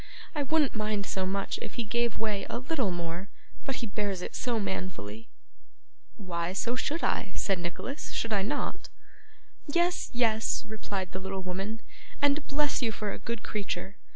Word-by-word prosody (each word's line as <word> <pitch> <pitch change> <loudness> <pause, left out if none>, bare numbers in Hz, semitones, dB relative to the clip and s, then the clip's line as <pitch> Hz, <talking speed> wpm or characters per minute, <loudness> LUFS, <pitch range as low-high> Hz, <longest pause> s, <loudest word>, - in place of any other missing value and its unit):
I 300 - +1
wouldn't 295 0 +4
mind 215 -2 +1
so 190 -1 0
much 195 +1 0
if - - -5
he 235 - +1
gave 235 +1 +2
way 215 -2 0
a - - 0
little 260 -3 +1
more; 175 +2 -2 0.4
but 270 - +1
he 240 - -1
bears 200 -3 -1
it - - -4
so 240 -3 +1
manfully.' 185 - -3 0.9
'Why, 175 -3 -1
so 235 +5 +1
I - - +1
should,' 285 - +1
said 195 -3 +2
Nicholas, 175 - -3
'should 225 -1 0
I 200 - +4
not?' 260 +9 -1 0.8
'Yes, 345 +4 +3
yes,' 225 -2 +3
replied 200 -4 -3
the 190 - -2
little 190 0 -3
woman, 195 +5 -2 0.4
'and 285 +1 +4
bless 295 0 +2
you 230 -3 +3
for 210 -1 -2
a - - -5
good 235 -2 -3
creature! 200 -1 -2
210 Hz, 170 wpm, -31 LUFS, 190-245 Hz, 0.9 s, wouldn't